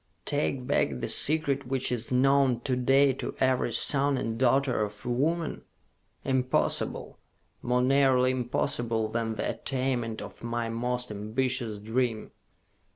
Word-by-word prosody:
"Take 140 -3 -1
back 65 - 0
the - - -3
Secret 140 -3 +4
which 130 -1 -1
is 120 -1 -2
known 130 -1 +3
to 130 +1 -1
day 135 +2 +3
to - - -6
every 130 -2 +1
son 140 +3 +2
and 115 -2 -3
daughter 130 -1 +2
of 105 +3 -7
woman? 150 +7 -1 0.6
Impossible! 130 -1 -1 0.4
More 125 +1 +1
nearly 130 -1 +3
impossible 120 -3 -1
than 115 0 -2
the - - -2
attainment 125 -4 -2
of - - -10
my 115 0 -3
most 125 +1 -3
ambitious 115 +2 -2
dream!" 110 +1 -2
125 Hz, 130 wpm, -27 LUFS, 115-135 Hz, 0.6 s, Secret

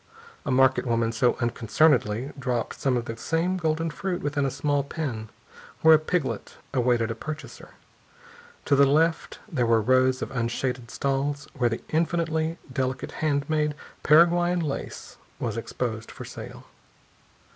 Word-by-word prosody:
A - - +1
market 130 0 +3
woman 115 -1 +1
as 115 -1 -6
unconcernedly 120 0 +2
dropped 125 -3 -2
some 130 -2 +1
of 120 - -3
the 115 - -5
same 170 +7 0
golden 165 -1 0
fruit 180 +3 -3
within 145 -1 0
a - - 0
small 145 +1 0
pen 130 -7 -4 0.5
where 160 0 +8
a 155 - +7
piglet 155 - -2 0.2
awaited 120 -3 +2
a - - -1
purchaser. 155 +7 -8 0.9
To 140 - +3
the 140 0 +6
left, 160 +4 +1
there 135 - 0
were 115 -1 +4
rows 130 +3 +3
of - - -6
unshaded 125 0 -2
stalls 140 +2 -1
where 125 -5 +1
the 115 - -4
infinitely 165 0 0 0.2
delicate 130 -1 -2
handmade 150 0 +1 0.3
Paraguayan 175 +3 +4
lace 150 -4 -5 0.2
was 115 -3 -2
exposed 115 -1 -4
for - - -9
sale. - - -9
135 Hz, 145 wpm, -26 LUFS, 120-155 Hz, 0.9 s, where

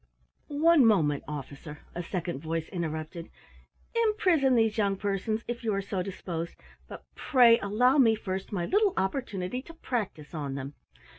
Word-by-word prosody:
"One 305 0 +4
moment, 160 -11 +3
Officer," 150 +1 -8
a 175 - -4
second 175 -3 -4
voice 165 0 -3
interrupted. 165 -1 -5 0.6
"Imprison 385 - +3
these 225 -2 +3
young 200 -2 +1
persons, 205 +3 -2
if 240 0 -4
you 220 -3 0
are 195 - 0
so 195 -1 -2
disposed, 175 -3 -5 0.3
but - - -10
pray 245 -5 +5
allow 245 +8 +3
me 225 -4 +5
first 190 -2 -5
my 180 -4 -1
little 410 - +2
opportunity 195 +1 -2
to 330 +5 -13
practise 210 - -4
on 145 -4 -4
them. 135 +1 -6
200 Hz, 150 wpm, -28 LUFS, 165-250 Hz, 0.6 s, pray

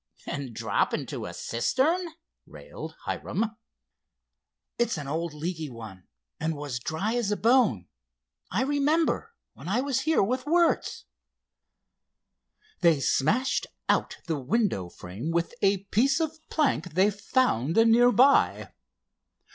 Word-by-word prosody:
"And 135 -5 -5
drop 110 -3 0
into - - -5
a - - -6
cistern!" 295 - 0 0.4
railed - - -9
Hiram. 220 +1 -2 1.2
"It's 235 -6 +1
an 145 -3 -6
old 165 +3 -2
leaky 160 0 -4
one 110 -7 -11 0.3
and 160 0 -1
was 145 -4 -4
dry 160 - -2
as 240 -4 0
a 210 - 0
bone, 225 - +3 0.6
I 210 +8 0
remember, 305 - +1 0.2
when - - -11
I 215 +7 +1
was 270 -2 0
here 315 -3 +2
with 255 +7 -2
Wertz." 340 +1 +1 1.7
They 165 -4 +4
smashed 210 - +1 0.2
out - - +1
the 160 -4 -2
window 140 - 0
frame 95 - -7
with 170 +4 -1
a 195 -1 +2
piece 265 - +3
of 320 -1 -2
plank 185 - 0
they 195 +3 +4
found 200 - 0
near 230 +2 +6
by. 265 +4 +3
200 Hz, 125 wpm, -27 LUFS, -, 1.7 s, near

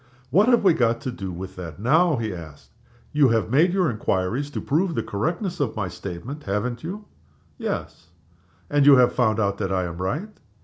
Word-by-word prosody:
"What 200 - +5
have 240 -3 +4
we 185 -4 +6
got 115 -6 +1
to 130 - -3
do 95 -6 -6
with 95 +2 -7
that 80 -4 -7
now?" 155 - +3
he 110 -4 -3
asked. 80 -4 -11 0.4
"You 145 -2 +5
have 115 -1 +1
made 160 +7 +4
your 185 -2 +2
inquiries 110 +3 -1
to - - -4
prove 165 +3 0
the 115 - -1
correctness 170 - -2
of 135 -6 -1
my 100 -4 -2
statement 95 - -7
haven't 115 +5 -2
you?" 200 +6 -6 0.5
"Yes." 85 - -4 0.6
"And 145 -1 +3
you 145 - +10
have 125 -1 +4
found 110 -3 +2
out 100 -2 0
that 95 -2 -2
I 95 -1 +1
am 85 -1 -5
right?" 150 - -2
120 Hz, 195 wpm, -24 LUFS, 95-155 Hz, 0.6 s, you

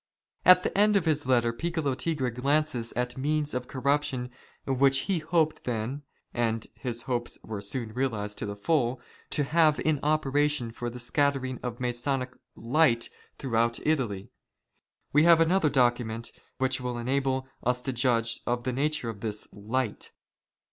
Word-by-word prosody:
At 180 0 +8
the - - -2
end 210 +1 +4
of 195 -4 +2
his 150 -4 +1
letter, 120 -2 +3
Piccolo 160 +1 -1
Tigre 135 -2 -1
glances 135 -1 0
at 125 +1 -2
means 150 +1 0
of 125 0 -3
corruption 135 -2 -1 0.3
which 135 0 +3
he 190 -4 0
hoped 160 0 0
then 125 +4 -3 0.2
— - - -44
and 115 -2 0
his 115 +1 -5
hopes 120 -2 -3
were 105 -2 -5
soon 110 +2 -3
realized 110 -5 -2
to - - -3
the 100 - -4
full 125 +2 +1 0.2
— - - -27
to 145 - +1
have 155 +1 +3
in 155 -2 +1
operation 145 -4 +1
for 120 +1 -4
the 120 - -8
scattering 130 +1 0
of 120 -1 -5
Masonic 125 +1 -1
" 125 - -55 0.2
light 115 -8 +4
" - - -33
throughout 115 -2 +1
Italy. 120 -11 -1 0.8
We 150 +3 +5
have 170 -1 +7
another 165 0 +3
document 120 -4 +1 0.3
which 130 0 0
will 125 -1 -3
enable 130 +2 0
us 125 0 0
to 130 - -2
judge 115 -2 +1
of 120 0 0
the 130 +1 -1
nature 145 -1 -1
of 105 - -12
this 105 -2 -4
" - - -26 0.2
light." 130 -4 -1
130 Hz, 170 wpm, -28 LUFS, 120-150 Hz, 0.8 s, At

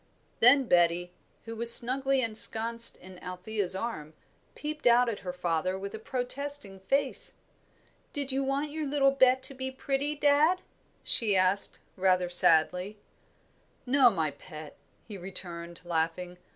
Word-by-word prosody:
Then 265 +4 +4
Betty, 175 -4 -1 0.3
who 230 0 -9
was 235 +1 +9
snugly 265 +3 +5
ensconced 230 +1 +5
in 185 -1 -15
Althea's 185 +1 -4
arm, 175 -8 -8 0.4
peeped 300 -2 -6
out 245 +1 +3
at 215 - -7
her 180 - -8
father 180 +1 -4
with 195 +1 -9
a 220 - -9
protesting 255 -2 -7
face. 275 +9 -1 0.8
"Did 285 -2 -5
you 270 +1 -3
want 280 +2 -4
your 310 -1 -6
little 275 -1 0
Bet 260 -1 +1
to 265 - 0
be 260 0 -7
pretty, 275 +2 -5
dad?" 295 +5 0 0.4
she 215 -4 -1
asked, 185 +2 +3 0.2
rather 185 -2 -1
sadly. 180 +4 +1 0.9
"No, 260 0 +3
my 160 -8 -3
pet," 155 +1 -14 0.3
he 205 -4 -11
returned, 175 -2 -6
laughing. 175 +2 -5
220 Hz, 140 wpm, -26 LUFS, 180-270 Hz, 0.9 s, was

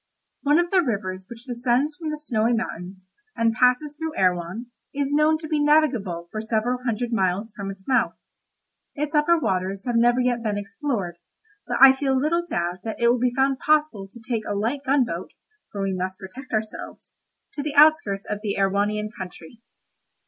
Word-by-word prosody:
One 290 +2 +3
of 345 0 +1
the 375 -2 +5
rivers 190 - -3
which 235 +1 -11
descends 250 +4 0
from 320 0 -5
the 305 - -3
Snowy 240 -6 0
Mountains, 185 -4 -5 0.3
and 230 0 +2
passes 250 +5 +2
through 320 0 -5
Erewhon, 185 +6 0 0.2
is 285 0 -1
known 305 +1 +4
to 315 0 -8
be 305 -1 0
navigable 245 - +2
for 215 - -4
several 225 +3 -1
hundred 235 0 -2
miles 200 +1 0
from 200 -1 -5
its 195 -1 -10
mouth. 260 - +2 0.8
Its 295 +1 -3
upper 305 +3 +4
waters 190 - -2
have 245 -2 -1
never 240 +2 +4
yet 245 -1 +1
been 210 -3 -1
explored, 200 - -4 0.5
but - - -1
I 270 0 +10
feel 265 -1 +1
little 335 +5 +1
doubt 175 - -2
that 220 -1 -5
it 235 0 +4
will 245 +1 +2
be 250 0 +2
found 270 0 +2
possible 300 -10 +1
to 220 +5 -14
take 225 0 -2
a 205 - -2
light 235 +8 -1
gunboat 255 -11 0 0.4
(for 200 -1 -3
we 195 -1 -1
must 185 0 -3
protect 245 +8 -11
ourselves) 215 -1 -5 0.4
to 290 - -4
the 290 0 -4
outskirts 290 -10 +4
of 210 - -3
the 210 -2 -2
Erewhonian 205 +2 0
country. 185 +3 -10
235 Hz, 185 wpm, -24 LUFS, 200-285 Hz, 0.8 s, I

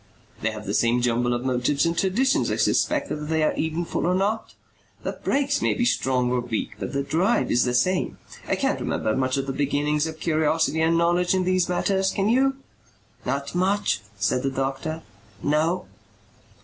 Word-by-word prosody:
"They 110 - +1
have 105 -1 -7
the 100 - -3
same 120 +2 +2
jumble 120 0 +1
of 120 +1 -2
motives 130 +4 +1
and 165 0 0
traditions, 260 - +2
I - - 0
suspect, 295 -2 +1
whether 150 - -3
they 160 0 +1
are 155 - +2
eventful 165 +2 -2
or 180 - +2
not. 205 +4 -1 0.5
The - - -2
brakes 280 0 +1
may - - +1
be 240 - +1
strong 125 - +1
or 125 - +1
weak 120 -3 -3
but - - -4
the 140 0 0
drive 160 -3 +1
is 120 - +3
the 125 0 0
same. 185 +9 +1 0.3
I - - +1
can't - - 0
remember 110 - -1
much 130 0 0
of 135 - -1
the 135 - -3
beginnings 145 +2 0
of 160 0 -7
curiosity 160 0 +1
and 165 +1 +3
knowledge 175 +2 +2
in 185 - +1
these 185 -1 +1
matters. 190 +2 +1
Can 195 +2 0
you?" 270 +3 +3 0.7
"Not 140 0 -2
much," 195 +3 +1 0.2
said 125 +5 +1
the 135 - 0
doctor. 135 +4 -3 0.4
"No." 155 +5 +1
160 Hz, 190 wpm, -24 LUFS, 130-185 Hz, 0.7 s, is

